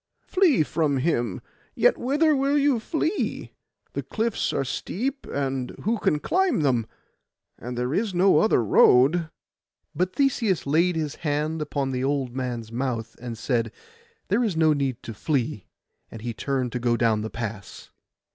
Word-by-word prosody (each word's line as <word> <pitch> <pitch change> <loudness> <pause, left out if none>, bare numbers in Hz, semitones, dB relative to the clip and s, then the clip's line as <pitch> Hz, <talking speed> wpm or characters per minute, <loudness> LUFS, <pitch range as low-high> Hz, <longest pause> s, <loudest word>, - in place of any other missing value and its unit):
Flee 355 - +3
from 150 -2 0
him: 120 - 0 0.3
yet - - +4
whither 295 +5 +2
will 275 +2 +2
you 280 -4 +3
flee? 320 - -2 0.4
The - - -2
cliffs 225 +1 -1
are 135 - -1
steep, 260 - -3
and 135 -2 -3
who 225 +2 0
can 150 - +2
climb 360 - +1
them? 125 -6 +1 0.7
and 125 +1 -6
there 125 +3 -1
is 210 +4 0
no 185 +2 +4
other 215 - +3
road.' 140 - +5 0.6
But 180 +4 -1
Theseus 235 - +1
laid 165 +5 +2
his 155 -3 -3
hand 155 0 -1
upon 140 -3 -2
the 130 0 -2
old 135 -3 -1
man's 120 -4 -4
month, 115 -2 -3
and 120 -2 -6
said, 115 -2 -1 0.6
'There 215 +6 +2
is 200 -8 -1
no 160 -1 +4
need 135 -4 -2
to 115 - -6
flee;' 130 - -2 0.4
and 110 - -10
he 120 -1 -3
turned 130 +1 -2
to 125 - -3
go 120 -1 +1
down 110 -2 +2
the 110 - -4
pass. 110 -4 -7
145 Hz, 160 wpm, -25 LUFS, 125-195 Hz, 0.7 s, road